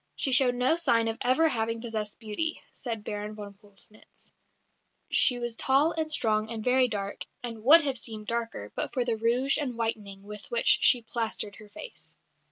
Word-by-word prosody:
"She 270 - 0
showed 250 -1 +6
no 255 +6 +2
sign 230 -9 +2
of 225 0 -3
ever 260 +6 +3
having 230 -3 -2
possessed 220 -3 -5
beauty," 230 +9 -4
says 230 -3 -4
Baron 210 0 -5
von 205 -1 -9
Pöllnitz; 205 +1 -13 0.8
"she 250 - +6
was 240 -1 -4
tall 275 +6 +3
and 315 -2 -2
strong 215 -6 +1
and 225 -2 -5
very 255 +1 +3
dark, 200 -3 -5 0.2
and 230 -3 -6
would 315 +7 +8
have 270 -4 -2
seemed 215 -2 -8
darker 230 - -4
but - - -4
for 250 -2 0
the 235 -2 0
rouge 240 +5 +1
and 255 -5 -4
whitening 210 -4 -4
with 210 0 -10
which 235 -1 +3
she 245 -2 +4
plastered 220 -3 -4
her 215 -2 -14
face." - - -11
230 Hz, 180 wpm, -27 LUFS, 215-255 Hz, 0.8 s, would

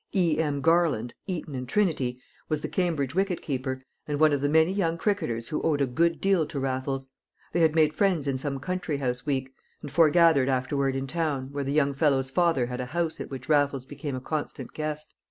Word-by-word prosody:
E.M. 155 -5 +1
Garland 160 -8 +2
(Eton 170 -6 -4
and 125 -1 -5
Trinity) 145 -12 +1 0.3
was 155 -2 0
the - - -3
Cambridge 160 -8 -1
wicketkeeper, 140 -9 -2 0.2
and 145 -1 -2
one 155 -1 +5
of 140 - 0
the 145 - +1
many 160 +4 +4
young 170 -4 0
cricketers 155 - -1
who 150 - -2
owed 155 -3 +1
a 140 - +3
good 165 +7 +1
deal 190 -6 +2
to 145 - -4
Raffles. 135 0 -2 0.4
They 175 - 0
had 160 -1 +4
made 155 -2 +4
friends 185 -7 +1
in 135 -2 -1
some 140 -1 -3
country 180 0 -2
house 125 -1 -2
week, 135 -2 -1 0.3
and 145 - -6
foregathered 160 -3 +5
afterward 135 +1 0
in 135 0 -2
town, 140 -3 -2
where 140 0 -3
the 135 - -2
young 140 -1 +2
fellow's 135 -2 +1
father 165 -6 +2
had 125 +1 -4
a 125 - -4
house 165 +4 -2
at - - -6
which 130 -2 -7
Raffles 145 -3 +2
became 145 0 -5
a - - -3
constant 155 +3 -4
guest. 155 0 -4
145 Hz, 205 wpm, -27 LUFS, 135-165 Hz, 0.4 s, one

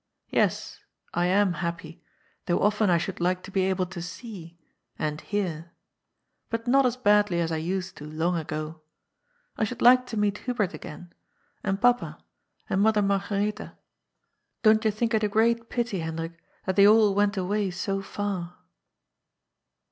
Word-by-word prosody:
Yes, - - 0 0.3
I 175 +1 +1
am 190 0 +3
happy, 170 0 -5 0.5
though 175 - +2
often 210 0 +2
I 175 - +4
should 185 +3 -4
like 180 +1 0
to 195 - -10
be 190 - +1
able 190 -1 0
to 180 -1 -8
see 175 -3 -9 0.4
r - - -1
and 150 0 -2
hearr 170 -6 -3 0.8
But 230 0 -3
not 265 +1 +4
as 250 0 -2
badly 205 -6 +3
as 165 -1 0
I 160 - 0
used 180 +3 -3
to 145 - -8
long 160 +3 -1
ago. 155 0 -4 0.8
I - - 0
should 225 +2 -3
like 250 +1 +6
to 225 - -5
meet 205 0 +1
Hubert 220 -8 -1
again, 155 +3 -10 0.5
and 195 -1 -1
papa, 245 +2 +2 0.5
and 190 - +1
Mother 215 0 +3
Marga 200 +1 0 0.2
retha. 210 - -11 0.9
Don't 215 -1 +5
you 220 - +3
think 230 +3 -1
it 220 -1 +2
a 210 - +2
great 230 +2 +2
pity, 235 -6 -1
Hendrik, 165 +1 -4 0.3
that 190 0 -1
they 200 0 +8
all 215 -1 +6
went 205 +1 +1
away 200 +2 0
so 195 +2 -2
f 195 - -11
ar 185 -4 -3
195 Hz, 170 wpm, -26 LUFS, 175-215 Hz, 0.9 s, they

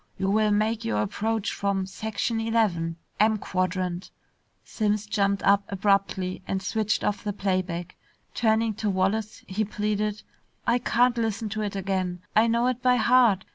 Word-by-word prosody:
You 195 0 0
will 215 +1 +3
make 215 +2 +1
your 105 -1 0
approach 220 - -2
from 200 -1 -1
section 220 +3 -2
eleven, 205 -8 +1 0.2
M 215 0 +4
quadrant 185 -1 -2 0.3
" - - -44
Simms 210 -1 -1
jumped 200 -1 0
up 200 0 +4
abruptly 195 -2 0
and 190 - -1
switched 215 +2 -1
off 205 - -1
the 210 - -1
playback. 185 -3 -2 0.4
Turning 220 -1 +2
to 215 -2 -1
Wallace, 200 +3 -1
he 200 +3 -1
pleaded, 210 0 -2 0.4
"I 235 +1 +3
can't 240 0 +2
listen 225 -1 -1
to 215 +1 -3
it 205 -1 -3
again! 185 -2 -2
I 220 +2 +5
know 235 +1 +2
it 250 -1 0
by 250 0 +4
heart. 235 -4 +4
210 Hz, 160 wpm, -26 LUFS, 190-220 Hz, 0.4 s, I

